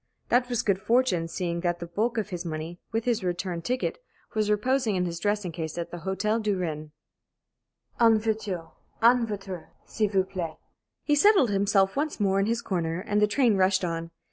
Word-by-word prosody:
That 245 +1 +3
was 240 -2 0
good 195 -2 +1
fortune, 225 -7 +2
seeing 170 0 -3
that 175 0 0
the 170 - -6
bulk 220 +8 -1
of 210 -2 -1
his 175 -2 -4
money, 165 +1 -5
with 225 0 -1
his 235 -5 +1
return 180 -1 -2
ticket, 255 - -2 0.3
was 215 -2 0
reposing 225 +1 +1
in 180 -1 +1
his 170 -1 -4
dressing 205 -1 -1
case 160 -1 -5
at 170 0 -4
the 175 - -6
Hôtel 200 +6 -1
du 210 -2 0
Rhin. 155 -4 -4 1.1
"En 225 -2 +6
voiture! 210 -6 -2 0.3
En 235 0 +5
voiture, 195 -5 -6 0.2
s'il 215 -2 0
vous 195 -2 +2
plaît!" 170 -4 -5 0.5
He 295 - +1
settled 295 - +5
himself 195 -1 +2
once 295 -1 -1
more 195 -1 +2
in 195 - +1
his 230 +1 -1
corner, 170 -3 -1
and 210 +1 0
the 210 - +5
train 235 -1 +3
rushed 190 0 +3
on. 165 -1 -3
195 Hz, 195 wpm, -27 LUFS, 175-225 Hz, 1.1 s, En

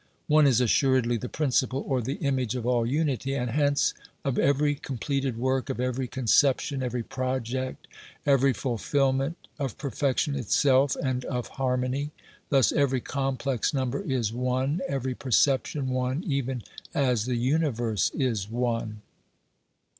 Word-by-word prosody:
One 150 -1 +5
is 125 -4 +4
assuredly 125 0 +3
the 125 +2 -5
principle 135 -2 0
or 130 -3 +1
the 135 +5 -3
image 130 -4 -1
of 120 -2 -3
all 120 -2 +2
unity, 135 -1 0
and 125 -3 -2
hence 145 +1 +2 0.3
of 135 -2 0
every 145 +1 +3
completed 135 -2 -3
work, 130 +2 0
of 130 - -3
every 125 0 -1
conception, 130 +3 +2
every 125 -1 -2
project, 130 +1 -3 0.4
every 140 -1 +4
fulfilment, 135 +5 0 0.2
of 135 -5 -3
perfection 140 +1 0
itself, 135 +1 +3
and 130 -2 -1
of 125 -2 -3
harmony. 130 +2 -1 0.4
Thus, 135 -4 +4
every 140 -3 +2
complex 135 -1 -1
number 130 +4 -1
is 130 - -1
one, 130 +6 0
every 130 -4 -2
perception 135 +2 +1
one, 130 +5 -1
even 135 - -2 0.3
as 125 -7 +2
the 125 -1 -1
universe 120 -5 +1
is 115 -8 -1
one. 115 -3 -2
130 Hz, 135 wpm, -27 LUFS, 125-140 Hz, 0.4 s, One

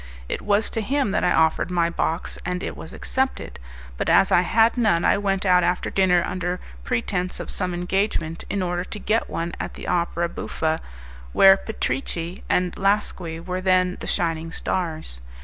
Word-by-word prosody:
It - - -3
was 210 +1 +1
to 225 - -1
him 265 0 0
that - - 0
I - - +3
offered 160 +2 +2
my 175 -2 +2
box, 165 0 -2
and 180 0 -3
it - - -4
was 160 - -9
accepted; 265 - -2 0.4
but - - -1
as 195 - +5
I 175 - +6
had 225 +5 +3
none, 215 -9 +2
I - - +5
went 195 -1 0
out 180 -1 +5
after 180 +1 0
dinner 180 -3 +3
under 180 0 -2 0.2
pretence 180 - -1
of - - -5
some 185 -2 -2
engagement, 175 -2 -1
in 200 -2 -1
order 175 0 -1
to 210 - -7
get 215 +3 0
one 170 +1 -3
at - - -5
the - - -8
opera 170 -1 0
buffa, 160 -1 -2 0.5
where 195 0 +8
Petrici 170 - -3
and 180 -1 +1
Lasqui 195 -4 0
were 180 +2 -4
then 185 -1 +2
the - - -6
shining 165 -1 -1
stars. 160 - -3
180 Hz, 180 wpm, -23 LUFS, 170-195 Hz, 0.5 s, where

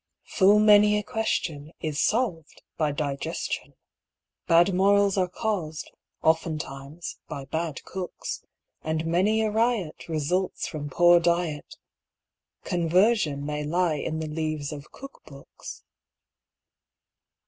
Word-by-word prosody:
Full 200 +1 +4
many 210 0 +6
a 210 - -2
question 165 -9 -2
is 155 -3 -2
solved 205 - -1
by 155 -2 0
digestion. 140 -1 -4 0.7
Bad 170 +3 +5
morals 200 +1 +3
are 185 -2 +1
caused, 180 -7 -3 0.3
oftentimes 155 -1 -2
by 140 -1 -6
bad 160 +1 -4
cooks, 185 -1 -6 0.4
And 160 0 -2
many 195 +7 +2
a 215 - 0
riot 220 -8 -1
results 165 +4 -1
from 145 -2 -5
poor 175 +4 +6
diet 170 -3 -1 0.9
Conversion 175 -3 +2
may 150 0 -3
lie 170 +2 +1
in 155 +2 -3
the 160 0 -3
leaves 155 -1 -3
of 145 -1 -9
cook 275 0 -12
books. 140 -2 -11
165 Hz, 115 wpm, -26 LUFS, 150-195 Hz, 0.9 s, many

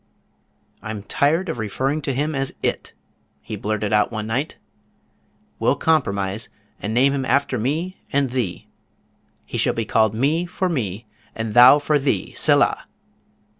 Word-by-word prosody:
"I'm 105 -2 -6
tired 160 - +1
of 160 -8 -4
referring 130 +8 -1
to 135 - -2
him 150 +4 -1
as 135 -1 -3
IT," - - -2 0.5
he - - -7
blurted 105 0 -2
out 105 +2 +3
one 110 -2 -4
night. 125 +7 -2 1.0
"We'll - - +2
compromise, 100 -10 0 0.3
and 105 - -3
name 130 +4 +3
him 135 -1 -1
after 130 0 +1
me 160 - -2
and 140 -2 +1
thee. 125 -8 -3 0.8
He - - -4
shall - - +1
be 115 - -2
called 110 -1 +2
Me 155 +9 +1
for 180 +1 -2
me, 115 - -3 0.3
and 115 -1 -4
Thou 125 +4 +9
for 150 0 +1
thee, 135 -9 -1
Selah!" - - +2
130 Hz, 150 wpm, -22 LUFS, 110-145 Hz, 1.0 s, Thou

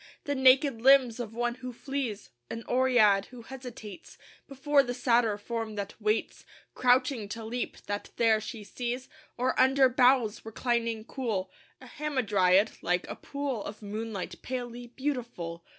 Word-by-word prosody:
The 285 - -1
naked 265 -2 +4
limbs 260 -2 +5
of 225 -2 -5
one 240 0 0
who 255 0 -5
flees? 250 -4 -4 0.2
An 230 - -5
Oread 240 -6 +4
who 245 -2 -12
hesitates 240 -6 -10 0.3
Before 280 +1 +3
the 245 -2 -4
Satyr 235 -4 +2
form 225 0 -4
that 200 -1 -4
waits, 215 +1 -1 0.3
Crouching 250 -3 +2
to 225 +1 -6
leap, 240 +2 -4
that 205 0 -4
there 225 -2 +3
she 220 0 -7
sees? 245 +4 -4 0.3
Or 255 +1 +1
under 265 0 +5
boughs, 250 -3 +3
reclining 230 0 -1
cool, 215 -9 -3 0.3
A 260 - -13
Hamadryad, 220 -9 +1
like 180 0 0
a - - -4
pool 280 -6 -4
Of 210 +1 -8
moonlight, 210 -1 -5
palely 245 -1 -5
beautiful? 235 - -4
240 Hz, 145 wpm, -29 LUFS, 215-260 Hz, 0.3 s, limbs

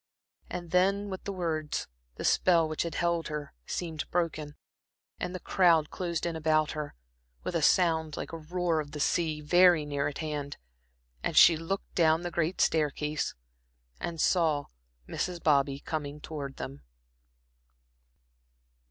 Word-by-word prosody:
And 175 -2 -6
then 195 +2 +2
with 190 - -6
the 200 - -2
words 160 -5 -2 0.3
the - - -5
spell 170 -3 +4
which 155 0 -2
held 170 0 0
her 150 -1 -5
seemed 160 -3 -4
broken, 155 -4 -2 0.6
and 180 +1 -3
the - - -4
crowd 170 -6 +3
closed 170 -3 -2
in 170 -1 -2
about 155 -1 +2
her, 150 -1 -5 0.5
with - - -3
a - - +1
sound 160 -4 +3
like - - -5
the 165 - -5
roar 170 +1 -1
of 145 -1 -5
the 150 - -5
sea 155 0 +1
very 175 0 +5
near 145 -1 -1
at 145 - -5
hand, 150 -2 -4 0.6
and - - -2
she 165 - +9
looked 165 +5 -4
down 160 0 +3
the 175 - -3
great 170 +1 -1
staircase, 150 -1 0 0.6
and 165 -1 -4
saw 155 -4 +2 0.4
Mrs. 180 -1 -3
Bobby 140 -2 +3
coming 150 -1 -4
towards 145 -3 -6
them. 70 +1 -7
160 Hz, 145 wpm, -29 LUFS, 150-175 Hz, 0.6 s, she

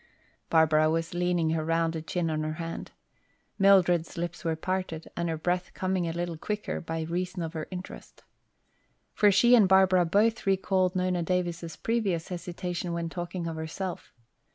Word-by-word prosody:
Barbara 155 -1 +4
was 165 +1 -1
leaning 175 -2 +1
her 160 -1 0
rounded 165 0 -1
chin 170 -3 -1
on 155 0 -1
her 155 0 -2
hand. 165 +1 -6 0.7
Mildred's 180 -4 +4
lips 175 +1 -4
were 165 -1 0
parted 180 -1 -3
and 170 0 -1
her 160 - -2
breath 180 +3 -2
coming 185 -2 -1
a - - -1
little 170 0 -3
quicker 210 +4 -3
by 165 -1 -4
reason 180 +2 -3
of 160 0 -5
her 160 -2 -4
interest. 185 0 -9 0.9
For 205 -1 +5
she 240 +5 +5
and 215 -6 +6
Barbara 190 -2 +5
both 215 +5 +2
recalled 190 -1 +2
Nona 180 -1 0
Davis' 170 -1 -2
previous 205 -8 -1
hesitation 175 -1 -4
when 170 -1 -2
talking 175 0 -5
of 165 -1 -4
herself. 175 +4 -5
175 Hz, 160 wpm, -28 LUFS, 165-185 Hz, 0.9 s, and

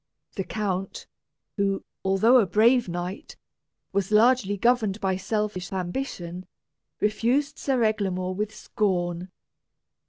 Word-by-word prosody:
The 195 - -2
count, 195 -2 -3 0.5
who, 195 -1 0 0.2
although 195 +6 +5
a 210 - +2
brave 225 +4 +4
knight, 175 +2 -5 0.6
was 200 0 0
largely 215 -2 +4
governed 220 -2 +2
by 190 -2 0
selfish 200 -1 -2
ambition, 180 -2 -4 0.5
refused 235 +7 +1
Sir 260 -4 +1
Eglamour 190 -4 0
with 210 +2 -2
scorn. 180 -4 -2
200 Hz, 105 wpm, -26 LUFS, 185-220 Hz, 0.6 s, although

